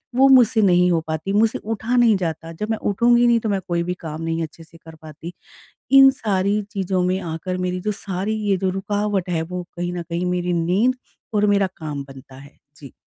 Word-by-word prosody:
वो 270 +1 +6
मुझसे 240 -4 +5
नहीं 180 -2 +4
हो 165 - +2
पाती। 160 +5 -3
मुझसे 220 +2 +2
उठा 225 +3 -3
नहीं 240 -3 +5
जाता, 165 -2 -4
जब 210 +6 -5
मैं 220 - 0
उठूँगी 240 +4 +3
नहीं 235 -1 +4
तो 220 -1 -3
मैं 195 -1 0
कोई 170 -1 0
भी 180 +1 -2
काम 160 -1 -7
नहीं 165 0 -2
अच्छे 160 +1 -9
से 165 +1 -18
कर 160 -1 -14
पाती। 160 +2 -10 0.6
इन 270 0 +9
सारी 200 0 0
चीज़ों 190 -3 -1
में 185 +1 0
आकर 175 +1 -4
मेरी 180 0 -2
जो - - +1
सारी 200 +1 -3
ये 195 - +3
जो 190 0 -1
रुकावट 195 0 -2
है 165 -2 0
वो 180 +2 -5
कहीं 175 0 -3
न 175 - -4
कहीं 170 +2 -2
मेरी 180 0 -1
नींद 205 +10 +2 0.4
और 210 0 +2
मेरा 195 -1 +2
काम 150 -3 -5
बनता 135 0 -13
है। 140 +1 -16 0.2
जी। 140 -6 -13
180 Hz, 215 wpm, -21 LUFS, 165-210 Hz, 0.6 s, इन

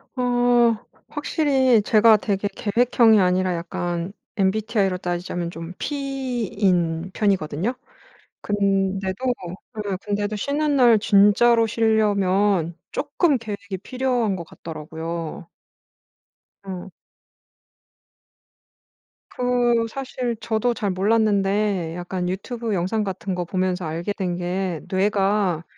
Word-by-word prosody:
어 245 -2 +3 0.3
확실히 265 -7 +2
제가 220 +1 +5
되게 205 -1 -1
계획형이 225 +1 +3
아니라 185 -1 +2
약간 175 +2 -3 0.2
MBTI로 200 -1 +1
따지자면 175 -1 -3
좀 165 +1 -8
P인 215 - -1
편이거든요. 195 - 0 0.7
근데도 195 +1 0 0.6
네 200 -2 -2
근데도 205 0 -2
쉬는 290 +6 0
날 240 -4 +6
진짜로 210 +3 +4
쉬려면 205 -5 +2
쪼끔 290 -1 +1
계획이 200 -3 -6
필요한 250 -5 0
것 175 - -5
같더라고요. 165 +2 -7 1.2
응. 185 0 -6 2.4
그 245 -2 +1
사실 255 -1 -4
저도 230 +2 0
잘 205 -4 -2
몰랐는데 200 -3 +1
약간 180 0 -3
유튜브 225 +4 -3
영상 195 +4 0
같은 190 -1 -4
거 180 -1 -2
보면서 185 0 -1
알게 165 +5 -3
된 185 -3 -2
게 180 -1 -2
뇌가 195 -3 +1
200 Hz, 220 characters per minute, -23 LUFS, 180-230 Hz, 2.4 s, 날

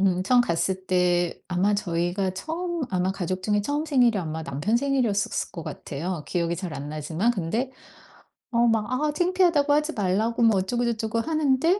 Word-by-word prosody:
음 185 -2 +2
처음 245 +6 +4
갔을 190 -2 -1
때 175 -1 +1
아마 185 +3 +1
저희가 180 0 -1
처음 335 - -4
아마 185 0 0
가족 185 0 -3
중에 210 +1 +1
처음 290 +8 -1
생일이 245 -8 +3
아마 160 -2 -4
남편 150 +11 0
생일이었었을 245 -7 0
것 165 - -6
같아요 160 +4 -5
기억이 170 -1 -1
잘 180 -2 -5
안 145 +1 -6
나지만. 160 +9 0
근데 225 +7 -2 0.8
어 235 0 +3
막 225 0 +1
아 295 +4 +1
창피하다고 350 -4 +2
하지 300 +2 +1
말라고 215 +4 0
뭐 225 -3 +5
어쩌고저쩌고 230 +2 -1
하는데 310 - +2
210 Hz, 360 characters per minute, -25 LUFS, 180-255 Hz, 0.8 s, 뭐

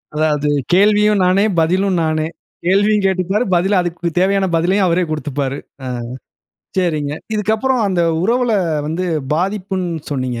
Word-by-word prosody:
அதாவது 150 -1 +1 0.2
கேள்வியும் 210 +1 +4
நானே, 185 +2 +3 0.2
பதிலும் 185 +3 +1
நானே. 155 0 0 0.4
கேள்வியும் 205 +3 +3
கேட்டுப்பாரு 190 +3 +1
பதில 190 +3 +2
அதுக்கு 175 -1 -4
வ - - +3
தேவையான 195 +1 +2
பதிலையும் 185 +4 +2
அவரே 175 +1 +2
கூடுத்துப்பாரு. 145 -3 -3 0.3
அ - - -4 0.9
சரிங்க 155 -6 0 0.2
இதுக்கப்புறம் 220 +5 0
அந்த 185 -2 0 0.2
உறவுல 240 +4 +1 0.3
வந்து 165 +4 -2 0.3
பாதிப்புன் 190 +1 -2 0.2
சொன்னிங்க. 130 -4 -2
185 Hz, 125 wpm, -17 LUFS, 155-200 Hz, 0.9 s, கேள்வியும்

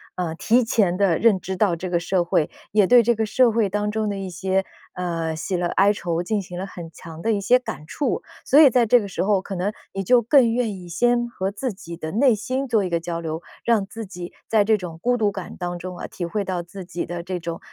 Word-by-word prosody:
呃， 175 -3 -2
提 235 +9 +2
前 200 -6 +1
地 190 -5 +2
认 225 -5 +4
知 190 +1 -4
到 190 -3 +2
这 180 +2 -5
个 170 - +2
社 180 +1 +1
会， 165 -3 +1 0.2
也 205 -2 +4
对 245 -1 +7
这 235 +2 +3
个 220 -1 -1
社 245 +2 +4
会 220 -2 +1
当 210 +2 -1
中 215 0 -1
的 200 - -3
一 195 -1 -4
些， 190 +2 0 0.3
呃， 165 -3 -2
喜 180 +4 -3
乐 175 0 0
哀 200 +4 +3
愁， 170 -3 -2
进 210 +3 -1
行 180 -2 -9
了 185 - -3
很 175 -4 -9
强 165 -1 -11
的 225 - +1
一 205 - +1
些 240 +6 +4
感 150 -10 -7
触。 280 - -2 0.2
所 285 - +5
以 295 -4 +8
在 240 0 +4
这 245 +2 +6
个 205 - -5
时 190 - -2
候， 200 0 +3
可 195 - -7
能 190 +2 -1 0.2
你 195 - -3
就 245 +6 +5
更 240 0 +5
愿 230 -3 0
意 180 -2 -10
先 240 +7 +2
和 190 -4 -3
自 250 +5 -3
己 170 -3 -9
的 160 -1 -6
内 250 +3 +4
心 255 +6 -2
做 225 -4 +2
一 185 - -2
个 170 -1 0
交 170 0 -4
流， 160 0 -5 0.2
让 225 -4 +2
自 220 +2 -7
己 180 -2 -8
在 220 -2 +4
这 220 +1 +4
种 175 -4 -7
孤 245 +3 +2
独 210 -3 +1
感 190 -2 -7
当 175 -1 -4
中 180 +1 -7
啊， - - -6
体 175 - -5
会 200 +4 -2
到 180 -2 -2
自 190 +2 -10
己 175 0 -4
的 175 0 -5
这 180 +1 -4
种， 170 0 -5
195 Hz, 280 characters per minute, -23 LUFS, 175-220 Hz, 0.3 s, 以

